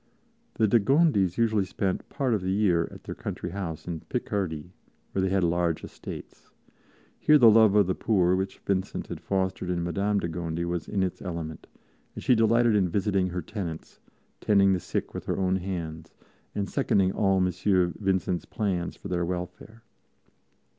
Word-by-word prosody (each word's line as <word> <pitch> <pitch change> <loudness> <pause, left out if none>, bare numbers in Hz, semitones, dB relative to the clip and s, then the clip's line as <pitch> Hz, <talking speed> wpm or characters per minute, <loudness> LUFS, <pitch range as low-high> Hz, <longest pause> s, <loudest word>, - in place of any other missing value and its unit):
The 110 - +3
de 115 +3 +5
Gondis 110 - +3
usually 110 -3 +2
spent 95 0 -3
part 130 -4 0
of 105 - 0
the 90 - -2
year 95 -4 +2
at - - -13
their - - -6
country 85 - -5
house 90 -5 -5
in 85 -2 -3
Picardy, 90 -2 -3 0.4
where 95 - -1
they 95 - +1
had 95 -1 +1
large 85 -1 +1
estates. - - -9 0.7
Here 150 - +6
the 120 -5 +8
love 110 -2 +6
of 105 -2 +6
the 95 - 0
poor 90 -5 +2
which 95 +1 -3
Vincent 95 -1 -1
had - - -7
fostered 95 -2 -1
in 85 -1 -1
Madame 100 +4 0
de 85 - -2
Gondi 85 0 -3
was 85 -1 -3
in 100 -2 0
its 95 - -3
element, 85 -4 -6 0.5
and - - -7
she - - +4
delighted 115 0 +4
in 95 -3 +2
visiting 95 0 +1
her 90 -1 -4
tenants, 90 -5 -6 0.4
tending 100 -2 +4
the 90 - 0
sick - - -4
with - - -6
her - - -1
own 95 0 +1
hands, 85 -3 -6 0.4
and 100 -1 -1
seconding 95 -1 +2
all 95 -1 +2
M. 90 -1 +2 0.5
Vincent's 95 -3 0
plans 95 -6 -2
for - - -9
their 90 -2 -1
welfare. 90 +6 -6
95 Hz, 175 wpm, -27 LUFS, 85-105 Hz, 0.7 s, the